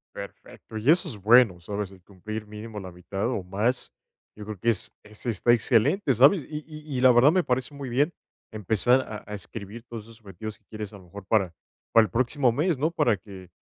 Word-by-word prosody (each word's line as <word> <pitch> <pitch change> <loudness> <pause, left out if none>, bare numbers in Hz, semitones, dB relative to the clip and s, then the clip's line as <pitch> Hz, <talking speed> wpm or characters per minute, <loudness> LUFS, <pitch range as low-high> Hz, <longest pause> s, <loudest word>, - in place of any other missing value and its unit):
Perfecto, 110 - -9
y 120 +8 +4
eso 175 +1 +2
es 115 -9 -6
bueno, 110 -3 +5
¿sabes? 100 +2 -4
El 95 -2 -17
cumplir 105 +3 -7
mínimo 105 0 -8
la 95 -2 -8
mitad 95 +4 -4
o 100 - -2
más, 105 +8 -1 0.4
yo 105 -1 -9
creo 105 -4 -7
que 115 - +1
es 110 - -1
es- 105 +2 -15
está 120 0 +2
excelente, 135 - +2
¿sabes? 140 - +5
Y 150 0 -6
y 150 -3 -7
y - - 0
la 130 -1 +7
verdad 125 +5 +6
me 180 -1 +2
parece 130 +3 -1
muy 140 -2 -6
bien 145 +8 +1 0.4
empezar 110 +4 +2
a 110 -4 -8
a 105 - -8
escribir 105 +3 -8
todos 115 -2 -6
esos 115 +1 -16
objetivos 105 +2 -8
que 110 - -42
quieres 110 -1 -7
a - - -9
lo 90 - -17
mejor 100 +2 -11
para 100 -3 +2 0.4
para 115 - +7
el 90 - -9
próximo 130 +1 +2
mes, 155 +6 +1
¿no? 155 +5 0
Para 120 - +2
que 95 -2 -12
110 Hz, 220 wpm, -26 LUFS, 100-130 Hz, 0.4 s, la